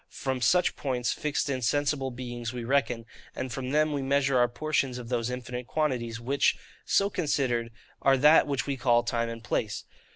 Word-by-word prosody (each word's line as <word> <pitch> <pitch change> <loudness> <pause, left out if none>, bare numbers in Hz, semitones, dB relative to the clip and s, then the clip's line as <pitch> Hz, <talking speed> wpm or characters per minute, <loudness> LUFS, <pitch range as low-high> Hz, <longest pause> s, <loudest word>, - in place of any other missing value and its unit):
From 130 -2 -3
such 180 +8 +3
points 125 -3 -1
fixed 150 -1 -1
in 130 -2 -2
sensible 145 +2 +1
beings 120 -2 -5
we 125 -2 -5
reckon, 120 -2 0 0.3
and 130 - -4
from 130 +1 -4
them 155 +2 +2
we 140 - -1
measure 135 0 +1
our 120 -1 +5
portions 135 0 -1
of 120 -2 -8
those 120 -1 -1
infinite 125 -1 -5
quantities; 125 -7 -1
which, 135 +4 +1 0.3
so 200 - +3
considered, 135 - -1 0.3
are 135 0 +4
that 150 +4 +6
which 140 -2 -1
we 140 -1 -2
call 120 -2 +3
TIME 115 -1 -1
and 115 0 -7
PLACE. 110 -3 -2
130 Hz, 185 wpm, -28 LUFS, 120-140 Hz, 0.3 s, that